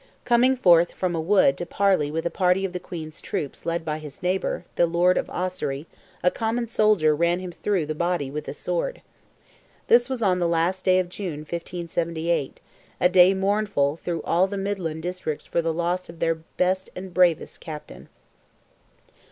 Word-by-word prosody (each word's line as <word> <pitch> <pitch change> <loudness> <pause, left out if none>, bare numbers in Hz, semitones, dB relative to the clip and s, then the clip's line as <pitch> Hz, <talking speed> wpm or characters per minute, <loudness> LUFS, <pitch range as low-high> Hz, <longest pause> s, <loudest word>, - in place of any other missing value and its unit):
Coming 250 +2 +4
forth 175 -7 +5
from 185 -2 -2
a 165 - -1
wood 175 -5 +4
to 175 - -3
parley 190 -7 +2
with 160 +2 -3
a 170 - 0
party 185 +1 +2
of 185 - -4
the 180 - -3
Queen's 160 -3 -8
troops 145 +2 -5
led 170 0 -1
by 155 -1 -2
his 150 +2 -11
neighbour, 180 -1 -1
the 170 - +3
Lord 175 +2 +3
of - - -1
Ossory, 170 -6 -3 0.4
a 180 - +4
common 230 +2 -1
soldier 210 -9 +3
ran 170 +2 +2
him 185 -1 -6
through 185 -1 -1
the 155 - -3
body 170 -4 -1
with 150 +1 -5
a - - -4
sword. - - -3 0.9
This 240 +2 +5
was 255 -3 -2
on 185 -3 +2
the 175 - +1
last 170 +3 0
day 185 -1 +5
of 185 -1 +1
June, 175 -5 -6
1578—a 170 -1 -3
day 185 +1 +6
mournful 195 -7 +1
through 170 0 -4
all 180 +3 +2
the 200 +1 -5
midland 185 -5 -3
districts 180 -4 -4
for 170 - 0
the 165 0 0
loss 175 +2 -2
of 165 - -10
their 165 0 +1
best 180 +3 -2
and 185 0 -7
bravest 175 -3 +2
captain. 155 -2 -9
175 Hz, 180 wpm, -24 LUFS, 165-190 Hz, 0.9 s, day